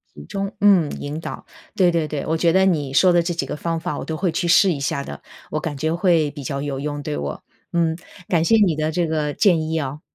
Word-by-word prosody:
集 75 - -10
中， 195 - -4
嗯， 190 -7 +5
引 145 +2 -5
导。 - - -7 0.3
对 180 -2 +4
对 165 -2 0
对， 150 -1 -4
我 160 - 0
觉 170 0 +3
得 190 +2 +4
你 150 -8 0
说 180 +5 +5
的 175 - +4
这 170 +1 -2
几 170 - -2
个 - - -4
方 165 +2 -2
法， 175 +2 -4
我 - - -4
都 160 - -4
会 180 0 0
去 175 - -1
试 185 +3 +5
一 145 - -5
下 140 0 -2
的， 70 - -8 0.3
我 155 - -1
感 150 -2 -4
觉 160 +3 -1
会 170 -4 +2
比 145 0 -9
较 140 +2 -3
有 140 -2 -3
用 145 +1 -4
对 75 - -3
我。 70 -1 -5 0.3
嗯， 165 -2 +1 0.3
感 165 -3 +2
谢 225 - +4
你 195 -7 +3
的 155 +1 -1
这 175 +1 0
个 155 -2 -1
建 175 -3 +3
议 160 0 0
哦。 145 +1 -5
160 Hz, 280 characters per minute, -21 LUFS, 145-175 Hz, 0.3 s, 嗯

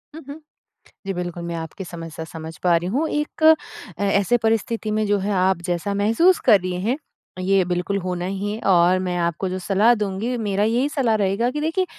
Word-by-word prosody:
हुँ, 320 - -8
हुँ। 290 +3 -8 0.7
जी, 195 - -2
बिल्कुल। 175 -1 -5
मैं 170 0 -4
आपकी 165 +3 -6
समस्या 165 -2 -8
समझ 160 0 -9
पा 175 -2 +4
रही 170 +1 -1
हूँ, 280 +10 0
एक 315 +1 +3 0.5
ऐसे 200 +3 +2
परिस्थिति 225 0 0
में 215 0 0
जो 205 0 +2
है, 200 +2 -2
आप 185 -1 +1
जैसा 175 +4 -2
महसूस 225 - +3
कर 215 -5 +7
रही 180 0 -3
हैं, 235 +7 0 0.4
ये 190 +1 +2
बिल्कुल 180 +3 -1
होना 180 -1 -3
ही 195 +2 -3
है 215 - -5
और 180 0 +5
मैं 180 -1 -2
आपको 170 +2 -1
जो 185 +1 -3
सलाह 205 +5 +3
दूँगी, 210 +3 -2
मेरा 205 -3 0
यही 240 +6 +1
सलाह 255 -7 +1
रहेगा 205 +3 +1
कि 295 +2 -4
देखिए 325 +5 0
195 Hz, 200 wpm, -22 LUFS, 180-225 Hz, 0.7 s, कर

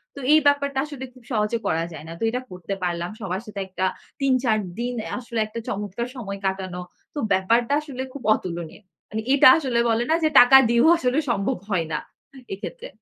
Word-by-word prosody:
তো - - -8
এই 310 - +7
ব্যাপারটা 280 -1 +2
আসলে 280 -3 -7
খুব 255 -2 -18
সহজে 215 +1 +1
করা 165 +1 +1
যায় 155 0 -9
না। 165 - -7
তো - - -4
এটা 250 +2 -2
করতে 180 +2 -5
পারলাম। 175 0 -2
সবার 190 +1 -3
সাথে 210 -2 -7
একটা 185 0 -2 0.4
৩ 270 -1 +3
৪ 220 -3 +3 0.2
দিন 245 +1 -2 0.3
আসলে 235 -2 -4
একটা 230 +2 -6
চমৎকার 205 +4 -3
সময় 200 -5 -6
কাটানো। 190 -2 -2 0.3
তো 295 - -4
ব্যাপারটা 230 +8 +2
আসলে 265 -4 -6
খুব 280 - -9
অতুলনীয়। 170 0 -6 0.3
মানে 220 +1 -3
এটা 280 - +7
আসলে 255 -6 0
বলে 225 +1 +2
না - - +5
যে, 310 - +4
টাকা 245 +2 +9
দিয়েও 235 +5 +4
আসলে 255 +1 +1
সম্ভব 235 +3 0
হয় 175 -5 0
না। 150 - 0 0.5
এক্ষেত্রে। 190 -3 -7
225 Hz, 195 wpm, -23 LUFS, 190-255 Hz, 0.5 s, টাকা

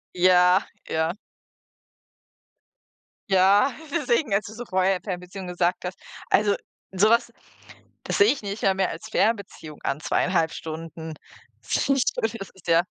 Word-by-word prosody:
Ja, 180 +1 +5 0.3
ja. 160 +1 0 2.2
Ja, 195 +7 +5 0.2
deswegen, 280 -6 +1
als 200 +1 +1
du 215 - -9
so 240 +2 -7
vorher 185 -1 +1
Fernbeziehung 185 0 -6
gesagt 180 +1 -1
hast 180 +1 -5 0.3
also, 205 -1 +4 0.4
sowas, 215 +5 +3 0.7
das - - -2
sehe 205 +3 +6
ich 280 - -3
nicht 205 +1 -5
mal 195 - +4
mehr 190 -1 0
als 220 - -8
Fernbeziehung 200 -9 -1
an, 150 - -1
2,5 165 0 +1
Stunden. 160 0 -7 0.5
Das - - 0
finde 275 0 +2
ich - - +2
zum - - -1
Beispiel, 225 +1 -2
das 195 - -7
ist 190 - -18
ja 165 +1 +5
190 Hz, 150 wpm, -25 LUFS, 180-215 Hz, 2.2 s, sehe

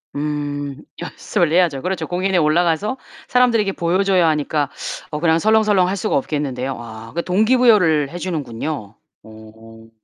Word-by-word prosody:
음 145 -1 -3 0.3
연습을 175 -1 -1
해야죠. 165 -6 +2
그렇죠. 185 0 -2
공연에 185 +1 0
올라가서 170 +8 +1 0.3
사람들에게 230 -5 +2
보여줘야 185 0 +2
하니까 150 -2 0 0.4
어 150 - -3
그냥 160 0 +3
설렁설렁 210 -2 +3
할 190 - -1
수가 - - -1
없겠는데요. 135 -2 -3
아 115 -1 -10
그 170 - -1
동기부여를 205 - +3
해주는군요. 150 - -5 0.3
어. 110 +1 -15
160 Hz, 340 characters per minute, -19 LUFS, 140-185 Hz, 0.4 s, 그냥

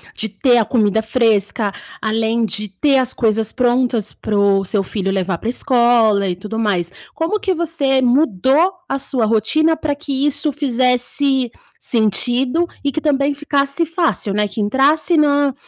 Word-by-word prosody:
de 220 - -3
ter 245 +5 +2
a 225 - +2
comida 220 -3 +1
fresca, 220 -2 0 0.3
além 225 +1 0
de 210 -1 -3
ter 270 +9 +1
as 255 -1 0
coisas 220 -2 0
prontas 245 -3 0
para 210 -1 -3
o 195 -1 +2
seu 195 +1 -1
filho 195 0 -3
levar 190 -2 -1
para 225 - -4
a - - +1
escola, 235 -6 +2
e 180 - -2
tudo 210 +5 -6
mais. 185 -6 -1 0.2
Como 335 +6 -1
que 390 -3 0
você 315 -6 0
mudou 265 - +2
a 275 - -2
sua 255 -4 -1
rotina 230 +10 +2
para 295 -2 -2
que 280 -1 -2
isso 290 +1 -1
fizesse 255 -1 0 0.3
sentido 245 - 0 0.2
e 285 - 0
que 315 - -3
também 285 -2 +1
ficasse 280 +1 -1
fácil, 330 - -1
né, 210 +1 0
que 205 +2 -5
entrasse 280 - +2
na 285 -2 +2
245 Hz, 165 wpm, -18 LUFS, 215-285 Hz, 0.3 s, ter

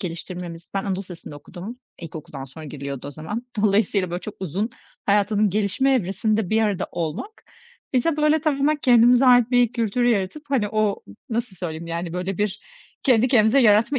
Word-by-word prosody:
geliştirmemiz 175 -1 -6
Ben 195 - +1
Anadolu 195 -2 -1
Lisesi'nde 175 -5 -9
okudum. 190 - -9 0.2
İlkokuldan 155 -4 -8
sonra 155 +4 -11
giriliyordu 140 -2 -6
o 145 - -5
zaman. 205 - -6 0.2
Dolayısıyla, 200 -3 +2
böyle, 175 +1 -3
çok 215 - -7
uzun, 190 +6 -2 0.4
hayatımın 205 +1 +3
gelişme 210 +7 +1
evresinde 210 -1 0
bir 220 +1 +3
arada 205 -4 0
olmak 170 - -5 0.5
bize, 290 +5 +2
böyle, 305 +1 +3
tamamen 300 0 +1
kendimize 245 -1 +5
ait 245 -1 +6
bir 245 -2 +3
kültür 235 0 0
yaratıp, 235 +4 0
hani, 255 -7 +1
o 215 -1 0 0.3
nasıl 225 -4 -2
söyleyeyim, 165 -2 -5
yani, 170 0 -4
böyle, 180 +2 -3
bir 205 -1 -1 0.4
kendi 250 -2 +4
kendimize 235 +2 +4
yaratma 230 +5 +4
210 Hz, 165 wpm, -23 LUFS, 180-245 Hz, 0.5 s, ait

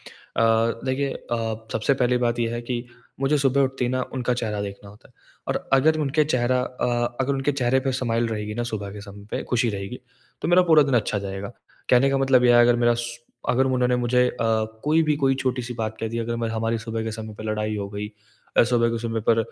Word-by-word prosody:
अ, 115 0 +1
देखिए 135 +1 0
अ, 110 -1 -4
सबसे 125 +6 +1
पहली 125 -1 +2
बात 120 0 0
ये 115 - +1
है 120 - -3
कि 120 0 -3 0.4
मुझे 140 +2 +2
सुबह 140 0 +2
उठते 135 -1 0
ही - - 0
ना 130 0 0
उनका 125 -1 0
चेहरा 110 -4 -2
देखना 100 0 -7
होता 105 +5 -18
है, 125 - -27 0.4
और - - -2
अगर 155 +4 +4
उनके 150 +1 +2
चेहरा 125 -3 +1
अ, 120 -1 -2
अगर 130 +1 +1
उनके 135 +2 0
चेहरे 130 -1 +1
पे 135 0 -1
स्माइल 120 -2 0
रहेगी 105 -1 -4
ना 120 - -2
सुबह 100 -2 -4
के 105 - -8
समय 100 0 -11
पे - - -2
खुशी 120 -1 +2
रहेगी, 100 +4 -6 0.4
तो - - -1
मेरा 180 +1 +6
पूरा 155 - +8
दिन 135 -2 0
अच्छा 110 -3 +1
जाएगा। 100 +2 -5 0.4
कहने 130 +2 +5
का 135 - +1
मतलब 135 -2 +4
यह 120 -1 +6
है 120 - +7
अगर 120 0 +4
मेरा 120 0 +3
श 120 0 -4 0.3
अगर 125 +2 +3
उन्होंने 125 -1 +2
मुझे 125 +1 +2
अ, - - -6 0.5
कोई 155 +2 +3
भी 155 -1 +2
कोई 135 -2 +2
छोटी-सी 125 -2 -2
बात 110 -1 -3
कह 115 - -2
दी 115 +1 -4
अगर 115 0 -2
हमारी 115 +1 -1
सुबह 115 0 -4
के 110 - -3
समय 110 -1 -7
पे 110 - -9
लड़ाई 110 0 -2
हो 100 -1 -4
गई, 105 +1 -4 0.5
और - - +8
सुबह 115 0 +2
के 115 - -2
समय 115 -1 -2
पर 115 - +5
120 Hz, 235 wpm, -24 LUFS, 110-130 Hz, 0.5 s, पूरा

